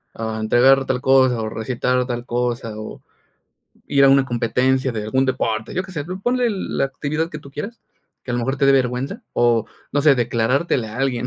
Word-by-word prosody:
ah, 110 Hz, -1 st, -4 dB
entregar 130 Hz, +5 st, +4 dB
tal 125 Hz, -1 st, -1 dB
cosa 130 Hz, -3 st, +4 dB
o 110 Hz, -, -3 dB
recitar 125 Hz, +2 st, -1 dB
tal 120 Hz, -1 st, -4 dB
cosa, 120 Hz, -2 st, -2 dB
o 110 Hz, -, -8 dB, 0.9 s
ir 140 Hz, -1 st, +4 dB
a -, -, +7 dB
una 135 Hz, -1 st, +5 dB
competencia 130 Hz, +2 st, +1 dB
de 105 Hz, -2 st, -4 dB
algún 130 Hz, +5 st, +1 dB
deporte, 110 Hz, -4 st, -2 dB
yo 185 Hz, -, 0 dB
que 185 Hz, -, -11 dB
sé, 150 Hz, -4 st, -4 dB
ponle 240 Hz, +7 st, -1 dB
la 195 Hz, -8 st, -2 dB
actividad 150 Hz, +4 st, -3 dB
que 150 Hz, -, -6 dB
tú 140 Hz, -2 st, -14 dB
quieras, 205 Hz, +12 st, -7 dB, 0.4 s
que 125 Hz, -, -6 dB
a -, -, 0 dB
lo -, -, 0 dB
mejor 135 Hz, +4 st, -1 dB
te 140 Hz, -, +3 dB
dé 140 Hz, -, +6 dB
vergüenza, 135 Hz, -, -1 dB
o 120 Hz, -2 st, +2 dB, 0.3 s
no 145 Hz, -, +1 dB
sé, 150 Hz, -2 st, +6 dB
declarártele 120 Hz, +2 st, 0 dB
a 110 Hz, +4 st, -8 dB
alguien, 125 Hz, -3 st, -1 dB
130 Hz, 200 wpm, -21 LUFS, 120-140 Hz, 0.9 s, a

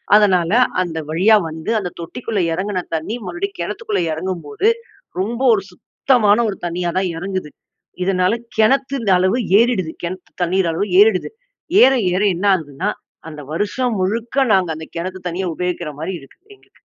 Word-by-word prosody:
அதனால, 185 Hz, -5 st, +4 dB, 0.3 s
அந்த 165 Hz, -3 st, -3 dB
வழியா 190 Hz, +8 st, +4 dB
வந்து, 160 Hz, +7 st, -5 dB
அந்த 180 Hz, -, -4 dB
தொட்டிக்குள்ள 220 Hz, +5 st, -4 dB
இறங்கின 185 Hz, +1 st, -2 dB
தண்ணீ 160 Hz, +8 st, -3 dB
மறுபடியும் 395 Hz, -, -4 dB
கிணத்துக்குள்ள 445 Hz, -2 st, -2 dB
இறங்கும்போது, 175 Hz, -, -2 dB, 0.5 s
ரொம்ப 230 Hz, +6 st, -2 dB
ஒரு 205 Hz, -, 0 dB
சுத்தமான 215 Hz, +2 st, +2 dB
ஒரு 195 Hz, -, -5 dB
தண்ணீயா 175 Hz, 0 st, -2 dB
தான் 190 Hz, -2 st, -1 dB
இறங்குது. 185 Hz, -3 st, -4 dB, 0.5 s
இதனால 185 Hz, +1 st, +2 dB, 0.2 s
கிணத்தொட 255 Hz, -1 st, +2 dB
அளவு 190 Hz, +7 st, +2 dB, 0.2 s
ஏறிடுது. 210 Hz, -9 st, +1 dB
கிணத்து 180 Hz, +2 st, -6 dB
தண்ணீர் 180 Hz, 0 st, +1 dB
அளவு 205 Hz, +5 st, -1 dB
ஏறிடுது. 210 Hz, -3 st, +3 dB, 0.5 s
ஏற 265 Hz, -, +7 dB, 0.2 s
ஏற 185 Hz, -, +1 dB
என்ன 195 Hz, +4 st, -3 dB
ஆகுதுன்னா, 165 Hz, +3 st, -2 dB, 0.4 s
அந்த 150 Hz, -1 st, -9 dB
வருஷம் 215 Hz, +5 st, -1 dB
முழுக்க 230 Hz, +7 st, 0 dB
நாங்க 185 Hz, -4 st, +2 dB
அந்த 160 Hz, 0 st, -8 dB
கிணத்து 185 Hz, +2 st, -5 dB
தண்ணீய 180 Hz, +2 st, -2 dB
உபயோகிக்கிற 180 Hz, -3 st, -3 dB
மாரி 170 Hz, +4 st, -3 dB
இருக்கு 135 Hz, -, -18 dB, 0.2 s
எங்களுக்கு. -, -, -29 dB
190 Hz, 145 wpm, -19 LUFS, 175-220 Hz, 0.5 s, ஏற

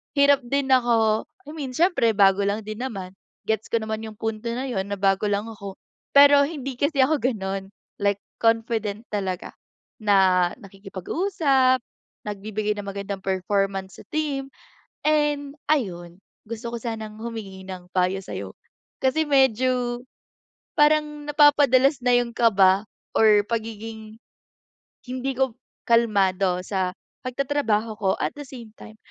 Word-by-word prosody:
hirap 280 Hz, 0 st, +5 dB
din 275 Hz, 0 st, 0 dB
ako, 230 Hz, -4 st, +3 dB, 0.2 s
I -, -, -7 dB
mean 275 Hz, -5 st, -6 dB
siyempre 325 Hz, -, +3 dB
bago 195 Hz, -1 st, +5 dB
lang 210 Hz, +2 st, -1 dB
din 215 Hz, +2 st, -7 dB
naman, 195 Hz, -8 st, -5 dB, 0.3 s
gets 220 Hz, 0 st, -1 dB
ko 230 Hz, -2 st, 0 dB
naman 220 Hz, 0 st, -3 dB
yung 215 Hz, -1 st, -9 dB
punto 225 Hz, +1 st, -4 dB
na 255 Hz, +2 st, -3 dB
yun 195 Hz, -7 st, -2 dB
na 200 Hz, -, -3 dB
bago 195 Hz, +1 st, +2 dB
lang 205 Hz, 0 st, 0 dB
ako. 200 Hz, -3 st, -8 dB, 0.4 s
Pero 285 Hz, 0 st, +8 dB
hindi 275 Hz, -5 st, -6 dB
kasi 285 Hz, -2 st, +3 dB
ako 295 Hz, +1 st, +2 dB
ganun, 195 Hz, -6 st, -2 dB, 0.3 s
like 200 Hz, 0 st, +1 dB, 0.2 s
confident 225 Hz, -2 st, 0 dB
talaga, 190 Hz, -3 st, -3 dB, 0.5 s
na 190 Hz, -4 st, +4 dB
nakikipag-usap, 255 Hz, -, 0 dB, 0.4 s
nagbibigay 210 Hz, +1 st, -3 dB
ng 200 Hz, -, -7 dB
magandang 200 Hz, 0 st, -5 dB
performance 195 Hz, 0 st, -1 dB
sa -, -, -13 dB
team, 290 Hz, -3 st, -2 dB, 0.6 s
and 295 Hz, -1 st, +1 dB
ayun, 175 Hz, -, -1 dB, 0.3 s
gusto 230 Hz, +1 st, -6 dB
ko -, -, -2 dB
sanang 220 Hz, -2 st, -6 dB
humingi 210 Hz, -5 st, -7 dB
ng 180 Hz, -1 st, -9 dB
payo 185 Hz, +1 st, +1 dB
sayo. -, -, -7 dB, 0.5 s
Kasi 310 Hz, +4 st, +2 dB
medyo, 255 Hz, -2 st, +2 dB, 0.8 s
parang 300 Hz, 0 st, +3 dB
napapa-dalas 285 Hz, -2 st, +5 dB
na 245 Hz, -, +5 dB
yun 240 Hz, -1 st, +1 dB
kaba 200 Hz, -3 st, +4 dB, 0.3 s
or 210 Hz, -2 st, +6 dB
pagiging, 220 Hz, -1 st, -5 dB, 0.9 s
hindi 255 Hz, +1 st, -3 dB
ko 265 Hz, -3 st, 0 dB, 0.3 s
kalmado 195 Hz, -5 st, +3 dB
sa 190 Hz, -2 st, -1 dB, 0.4 s
pag-tatrabaho 250 Hz, -5 st, 0 dB
ko 195 Hz, -3 st, +1 dB
at -, -, -1 dB
the 290 Hz, -, -6 dB
same 235 Hz, -5 st, -11 dB
time. 215 Hz, 0 st, -12 dB
225 Hz, 135 wpm, -24 LUFS, 200-265 Hz, 0.9 s, Pero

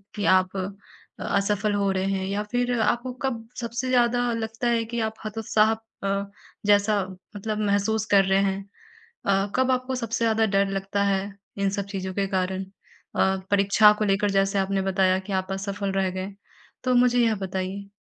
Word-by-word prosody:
कि 205 Hz, -, -2 dB
आप 185 Hz, +1 st, -2 dB, 0.6 s
असफल 205 Hz, +1 st, 0 dB
हो 200 Hz, -1 st, +1 dB
रहे 190 Hz, 0 st, -1 dB
हैं 190 Hz, -1 st, -1 dB
या 200 Hz, +1 st, -1 dB
फिर 245 Hz, 0 st, 0 dB
आपको 240 Hz, +3 st, 0 dB
कब 235 Hz, -4 st, -3 dB
सबसे 235 Hz, +2 st, -3 dB
ज़्यादा 245 Hz, -1 st, +2 dB
लगता 225 Hz, +1 st, -3 dB
है 230 Hz, -1 st, +2 dB
कि 235 Hz, +1 st, -4 dB
आप -, -, -16 dB
हतोत्साह 215 Hz, 0 st, +2 dB
अ, 200 Hz, -3 st, -4 dB, 0.3 s
जैसा 205 Hz, 0 st, +3 dB, 0.3 s
मतलब 215 Hz, +1 st, -3 dB
महसूस 210 Hz, +1 st, +1 dB
कर 195 Hz, -1 st, +6 dB
रहे 190 Hz, 0 st, +3 dB
हैं? 195 Hz, 0 st, -1 dB, 0.6 s
अ, 195 Hz, 0 st, +2 dB
कब 260 Hz, 0 st, +3 dB
आपको 255 Hz, +1 st, -1 dB
सबसे 230 Hz, -1 st, -1 dB
ज़्यादा 225 Hz, 0 st, +3 dB
डर 200 Hz, -1 st, +2 dB
लगता 195 Hz, +1 st, -1 dB
है 195 Hz, -1 st, +2 dB, 0.4 s
इन 200 Hz, 0 st, +1 dB
सब 200 Hz, 0 st, -3 dB
चीज़ों 190 Hz, -2 st, -4 dB
के 195 Hz, +1 st, 0 dB
कारण 190 Hz, 0 st, -1 dB, 0.5 s
अ, 190 Hz, 0 st, +2 dB
परीक्षा 200 Hz, +1 st, +6 dB
को 215 Hz, -, +1 dB
लेकर 200 Hz, +1 st, +2 dB
जैसे 195 Hz, 0 st, +2 dB
आपने 195 Hz, 0 st, 0 dB
बताया 190 Hz, -1 st, +2 dB
कि 190 Hz, +1 st, -6 dB
आप 190 Hz, 0 st, -1 dB
असफल 200 Hz, +1 st, -3 dB
रह 190 Hz, -1 st, +1 dB
गए, 185 Hz, +2 st, -5 dB, 0.5 s
तो 255 Hz, -1 st, +2 dB
मुझे 245 Hz, 0 st, +4 dB
यह 225 Hz, -1 st, +2 dB
बताइए? 190 Hz, 0 st, -4 dB
200 Hz, 175 wpm, -25 LUFS, 195-225 Hz, 0.6 s, कर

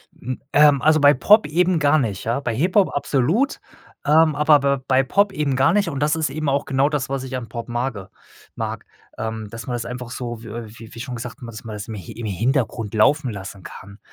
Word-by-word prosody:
Hm, 130 Hz, +1 st, -6 dB
ähm, 145 Hz, -3 st, +5 dB
also, 155 Hz, +2 st, +4 dB
bei 145 Hz, 0 st, +6 dB
Pop 210 Hz, -, +5 dB
eben 175 Hz, +2 st, +2 dB
gar 150 Hz, +1 st, +4 dB
nicht, 105 Hz, -7 st, -2 dB
ja? 115 Hz, +4 st, -1 dB
Bei 120 Hz, -5 st, -3 dB
Hip-Hop 180 Hz, -, +2 dB
absolut, 155 Hz, -, +1 dB, 0.5 s
ähm, 155 Hz, 0 st, +4 dB
aber 150 Hz, 0 st, +5 dB, 0.2 s
b 130 Hz, -, -15 dB
bei 130 Hz, 0 st, +3 dB
Pop 200 Hz, +9 st, +2 dB
eben 145 Hz, -5 st, -1 dB
gar 135 Hz, +6 st, +3 dB
nicht 205 Hz, -4 st, +2 dB
und 140 Hz, -4 st, -4 dB
das 150 Hz, +1 st, +1 dB
ist 160 Hz, -1 st, -1 dB
eben 155 Hz, -1 st, -2 dB
auch 140 Hz, +1 st, 0 dB
genau 135 Hz, +1 st, +1 dB
das, 145 Hz, -3 st, -2 dB
was 135 Hz, -1 st, -3 dB
ich 130 Hz, 0 st, -5 dB
an 115 Hz, -4 st, -6 dB
Pop 115 Hz, +1 st, -6 dB
mage 120 Hz, -5 st, -3 dB, 0.5 s
mag. -, -, -5 dB, 0.3 s
Ähm, 110 Hz, -1 st, -4 dB
dass 115 Hz, 0 st, -8 dB
man 125 Hz, -, -4 dB
das 120 Hz, -1 st, -3 dB
einfach 125 Hz, 0 st, -7 dB
so, 120 Hz, -2 st, -6 dB
w -, -, -10 dB
äh, 115 Hz, +1 st, -6 dB
wie 115 Hz, -1 st, -12 dB
wie 115 Hz, -, -10 dB
schon 125 Hz, 0 st, -5 dB
gesagt 120 Hz, +2 st, -7 dB
hat, -, -, -28 dB
man 120 Hz, -1 st, -8 dB
dass 110 Hz, -, -10 dB
man 110 Hz, -1 st, -6 dB
das 105 Hz, -1 st, -7 dB
i 110 Hz, -, -5 dB
Hi 90 Hz, -, -9 dB
im 115 Hz, -, -7 dB
Hintergrund 115 Hz, -, -1 dB
laufen 130 Hz, +4 st, +3 dB
lassen 95 Hz, -1 st, -8 dB
kann, 100 Hz, +2 st, -11 dB
130 Hz, 240 wpm, -21 LUFS, 115-150 Hz, 0.5 s, bei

